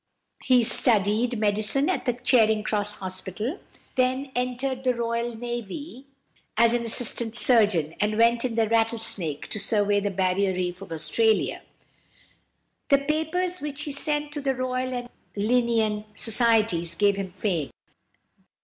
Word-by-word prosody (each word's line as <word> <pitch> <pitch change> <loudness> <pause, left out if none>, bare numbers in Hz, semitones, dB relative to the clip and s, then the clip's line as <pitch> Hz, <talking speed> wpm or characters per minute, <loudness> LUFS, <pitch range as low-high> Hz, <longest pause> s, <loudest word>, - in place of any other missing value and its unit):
He 250 -2 +4
studied 225 +1 +3
medicine 215 +6 +2
at 370 - -1
the 245 - +1
Charing 225 -3 +2
Cross 210 -1 -1
Hospital, 190 - -4 0.3
then 260 +1 0
entered 250 +1 -2
the 255 -1 +1
Royal 235 0 -2
Navy 240 - -7 0.5
as 235 +1 +4
an 240 -1 0
assistant 235 -1 +1
surgeon, 210 - +3
and 210 +1 0
went 235 +1 +3
in 245 -3 -2
the 225 -1 +1
Rattlesnake 225 -9 -1
to 215 - -4
survey 205 -1 +1
the 205 0 -2
Barrier 190 0 0
Reef 180 0 -3
of 195 - -10
Australia. 220 +8 0 1.3
The 280 - +6
papers 320 +5 -2
which 295 0 -4
he 300 - -5
sent 295 +1 +1
to 295 -1 -4
the 270 -1 -1
Royal 255 0 -2
and 245 -1 -5 0.3
Linnæan 220 -1 +1
Societies 220 -6 +2
gave 205 -1 +2
him 195 -2 -5
fame. 180 -7 -2
230 Hz, 140 wpm, -25 LUFS, 205-255 Hz, 1.3 s, The